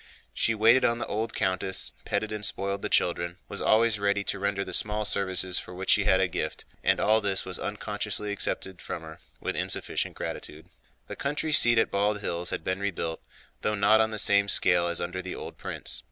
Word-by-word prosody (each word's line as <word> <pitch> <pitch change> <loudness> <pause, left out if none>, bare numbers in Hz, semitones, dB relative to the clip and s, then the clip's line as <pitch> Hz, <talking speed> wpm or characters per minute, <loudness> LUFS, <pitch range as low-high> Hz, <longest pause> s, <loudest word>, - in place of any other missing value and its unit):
She 115 - +1
waited 115 +4 +5
on 120 - +2
the 115 - -4
old 110 +2 -3
countess, 95 0 +1
petted 110 - -2
and 105 -1 -4
spoiled 100 0 -1
the - - -3
children, 85 0 0
was - - -6
always 110 -1 +3
ready 100 0 +1
to 100 - -2
render 100 0 -1
the - - -6
small 105 0 +1
services 95 -3 +1
for 90 - -10
which 95 +1 0
she 100 - +4
had 95 -2 +4
a 95 - +2
gift, 90 - -4 0.2
and - - +2
all 110 +1 +3
this 100 -2 0
was 95 - -3
unconsciously 105 0 -1
accepted 95 -2 -1
from 85 - -6
her 80 0 -11 0.2
with - - -3
insufficient - - -2
gratitude. 75 +1 -7 0.4
The - - -8
country 150 +2 -2
seat 120 -4 +7
at 115 - +2
Bald 105 +1 +1
Hills 85 -3 -1
had - - -3
been 95 +2 -2
rebuilt, 85 -5 -3 0.4
though 105 - 0
not 105 +2 +4
on 110 - +1
the 110 - -5
same 100 -1 +4
scale 90 -3 +4
as 85 -1 0
under 95 +1 -3
the - - -6
old - - -9
prince. - - -3
100 Hz, 210 wpm, -27 LUFS, 95-105 Hz, 0.4 s, seat